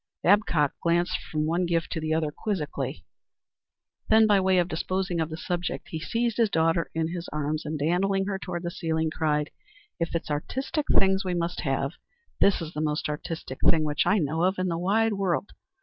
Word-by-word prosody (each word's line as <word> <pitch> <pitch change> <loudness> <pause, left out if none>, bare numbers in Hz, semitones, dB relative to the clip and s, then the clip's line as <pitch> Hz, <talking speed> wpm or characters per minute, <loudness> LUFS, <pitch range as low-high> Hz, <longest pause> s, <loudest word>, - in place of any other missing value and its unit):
Babcock 175 -7 +3
glanced 175 +2 +1
from 155 -1 0
one 170 +3 +1
gift 165 -1 0
to 160 - -2
the 155 0 -2
other 155 -1 +1
quizzically. 150 - -3 1.0
Then 220 0 +6
by 205 -2 +5
way 190 0 +3
of 175 -1 +3
disposing 185 +1 -2
of 160 - -1
the 160 - -5
subject 175 +2 -3
he 160 - -4
seized 230 +6 -1
his 230 -3 +3
daughter 165 -1 +1
in 160 0 0
his 175 0 -5
arms 150 +1 -2
and 155 +1 -2
dandling 190 +6 +1
her 195 -1 -2
toward 175 -2 -5
the 175 - -3
ceiling 160 -2 -1
cried, 150 -2 0 0.5
"If 170 0 -2
it's 165 - -2
artistic 265 - -2
things 190 0 +4
we 180 -2 -1
must 175 +1 -2
have, 135 -2 0 0.5
this 195 -3 +4
is 160 +1 -7
the 150 - -3
most 150 0 -1
artistic 150 -2 -5
thing 160 -2 +4
which 150 -1 0
I 210 - +4
know 160 -2 0
of 185 +2 +2
in 185 0 0
the 165 - -1
wide 215 +5 +2
world. 195 -1 -1
170 Hz, 195 wpm, -27 LUFS, 155-190 Hz, 1.0 s, Then